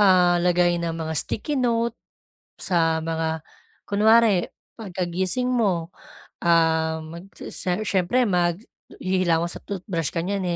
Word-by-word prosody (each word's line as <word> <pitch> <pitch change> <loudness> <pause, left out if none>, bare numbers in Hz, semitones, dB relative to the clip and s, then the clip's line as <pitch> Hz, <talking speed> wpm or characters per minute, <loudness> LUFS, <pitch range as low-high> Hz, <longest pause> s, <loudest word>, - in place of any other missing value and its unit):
ah, 180 -3 +5
lagay 175 -1 +2
ng 165 -1 -2
mga 160 -1 -3
sticky 280 +4 -2
note 235 -1 +1 0.6
sa 165 -3 +1
mga 160 -1 -2 0.4
kunwari, 215 -2 +4 0.3
pagkagising 190 +4 -2
mo, 190 -9 0 0.5
um, 160 0 +1 0.2
si - - -7 0.4
siyempre 200 +7 +2
maghihilamos 175 -1 -1
at - - -10
tothbrush 180 -5 -3
ka 165 - -1
niyan, 200 -1 -1
175 Hz, 110 wpm, -24 LUFS, 165-200 Hz, 0.6 s, ah